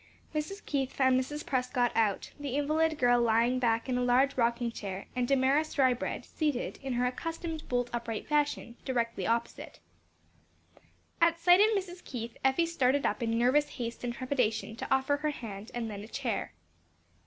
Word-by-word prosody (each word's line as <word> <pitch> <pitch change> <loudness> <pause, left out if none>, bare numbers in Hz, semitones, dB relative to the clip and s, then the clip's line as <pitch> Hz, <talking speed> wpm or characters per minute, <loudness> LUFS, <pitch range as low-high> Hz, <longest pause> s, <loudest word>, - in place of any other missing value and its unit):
Mrs. 310 +7 -4
Keith 270 -3 -1
found 260 -1 +3
Mrs. 295 +4 -4
Prescott 250 -2 0
out, 215 -3 0
the 280 -3 -3
invalid 310 +2 +1
girl 245 -2 +4
lying 235 +2 +3
back 230 -1 +1
in 250 -1 0
a - - +1
large 255 +3 +3
rocking 235 -1 +1
chair, 195 -3 -6
and 250 -1 0
Damaris 275 +4 +2
Drybread 260 -3 +1
seated, 295 -6 -2
in 270 -2 -3
her 245 +1 +1
accustomed 325 +4 -4
bolt 245 -1 +1
upright 230 -2 -4
fashion, 290 -5 0
directly 235 -3 -1
opposite. 230 +1 -2 1.4
At 335 0 +4
sight 355 +2 +6
of 430 +1 +5
Mrs. 365 -2 -6
Keith, 235 -2 -6
Effie 265 +5 +3
started 280 -4 +1
up - - 0
in 230 -1 0
nervous 275 +5 +3
haste 235 -1 -5
and 245 - -1
trepidation, 240 -4 -1
to - - -6
offer 270 +2 +2
her 305 +1 -1
hand 220 -6 -7
and 235 -1 -2
then 205 -2 -6
a - - -9
chair. - - -3
255 Hz, 170 wpm, -30 LUFS, 235-295 Hz, 1.4 s, sight